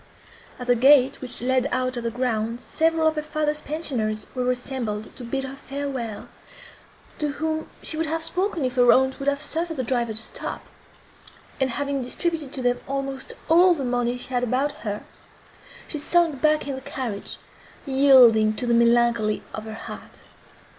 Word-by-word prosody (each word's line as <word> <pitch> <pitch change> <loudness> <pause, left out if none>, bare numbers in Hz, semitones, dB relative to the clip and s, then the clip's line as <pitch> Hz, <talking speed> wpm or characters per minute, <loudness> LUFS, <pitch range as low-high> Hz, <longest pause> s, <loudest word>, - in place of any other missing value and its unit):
At 250 - -6
the 245 0 +4
gate, 270 +2 +5
which 245 -2 -3
led 260 +1 +2
out 255 0 0
of 240 - -4
the 230 - 0
grounds, 230 -1 -2
several 325 0 +2
of 315 - +1
her - - +1
father's 300 0 -1
pensioners 245 -9 -2
were 250 -1 -1
assembled 245 -4 -3
to 250 - -9
bid 270 +3 -3
her 265 0 -6
farewell, 275 -6 -5 0.9
to 295 -2 -1
whom 315 +1 -3
she 310 - -3
would 325 0 0
have 325 +1 -1
spoken, 360 -2 -1
if 255 0 -3
her 245 -1 +7
aunt 265 +1 +3
would 275 - -5
have 280 0 +2
suffered 325 +2 -1
the 260 - -1
driver 235 -3 -1
to 220 - -3
stop; - - -6 0.9
and, 265 -1 +2
having 280 +2 -2
distributed 310 +3 -2
to 260 - -4
them 245 0 +1
almost 275 0 -3
all 350 +2 +6
the 275 -4 -3
money 245 0 0
she 245 - -7
had 245 - +1
about 260 +4 +1
her, 205 -1 -5 0.8
she 300 - -4
sunk 320 -3 +2
back 305 -1 +2
in 280 - -2
the 265 - -6
carriage, 235 -6 -5 0.5
yielding 255 -6 +6
to 245 - -3
the 240 - +2
melancholy 235 -2 +3
of 215 - -5
her 220 0 -7
heart. - - -10
260 Hz, 180 wpm, -24 LUFS, 240-295 Hz, 0.9 s, her